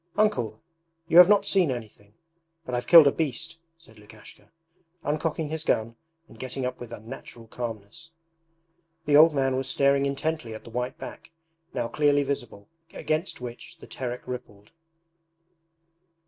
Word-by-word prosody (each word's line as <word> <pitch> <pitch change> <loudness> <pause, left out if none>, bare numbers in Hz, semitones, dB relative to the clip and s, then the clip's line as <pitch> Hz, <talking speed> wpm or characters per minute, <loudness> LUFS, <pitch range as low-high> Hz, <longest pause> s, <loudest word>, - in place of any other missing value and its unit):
Uncle, 125 - +1 0.5
you 170 - +7
have 180 +1 +9
not 205 -1 +4
seen 190 -6 +3
anything, 110 -4 -7 0.5
but 125 - -6
I've 125 0 -2
killed 165 -3 +10
a 140 - +5
beast,' 160 +3 -3 0.2
said 110 -10 -19
Lukashka, 105 +1 -16 0.5
uncocking 155 +1 -2
his 160 0 -4
gun 115 -5 0 0.3
and 115 - -17
getting 130 0 -4
up 125 - -4
with 120 -2 -9
unnatural 115 0 -10
calmness. 115 +6 -7 1.0
The 145 0 +3
old 155 +1 +7
man 135 -1 +1
was 135 0 -2
staring 140 0 +2
intently 140 -4 -3
at 110 - -10
the 115 - -12
white 125 +2 -3
back, - - -10 0.5
now 120 - -1
clearly 145 +1 +2
visible, 120 -7 -5 0.2
against 155 -2 -3
which 120 -1 -9
the - - -13
Terek 125 -1 -6
rippled. 105 -5 -8
130 Hz, 145 wpm, -26 LUFS, 115-155 Hz, 1.0 s, killed